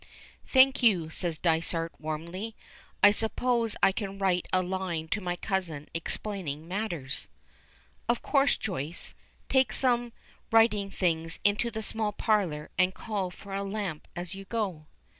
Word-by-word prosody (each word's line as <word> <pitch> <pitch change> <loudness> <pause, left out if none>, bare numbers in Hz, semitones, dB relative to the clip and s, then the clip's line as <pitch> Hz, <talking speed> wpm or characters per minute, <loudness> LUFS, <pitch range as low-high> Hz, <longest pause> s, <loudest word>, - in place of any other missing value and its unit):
"Thank 265 +1 +6
you," 180 -9 +4
says 170 -1 -2
Dysart 165 0 +1
warmly. 170 +8 -4 0.5
"I 205 - +10
suppose 230 +1 +1
I - - +7
can 195 0 -4
write 185 -3 +1
a 185 0 +3
line 180 -3 -2
to 210 - 0
my 175 -1 -1
cousin 175 -6 -3
explaining 165 -3 -3
matters." 175 -9 -3 0.8
"Of 235 - +1
course. 280 -1 +3
Joyce, 170 -5 -2 0.3
take 265 -1 +3
some 240 -2 +1 0.4
writing 225 -3 +4
things 165 -4 0
into 205 +4 +3
the 220 -1 -4
small 215 -1 -1
parlor, 190 -10 0
and 185 0 +3
call 205 -4 -2
for 195 +2 -10
a 195 - -1
lamp 195 -6 -4
as 175 0 -4
you 195 0 -8
go." 190 -8 -2
195 Hz, 140 wpm, -29 LUFS, 165-220 Hz, 0.8 s, I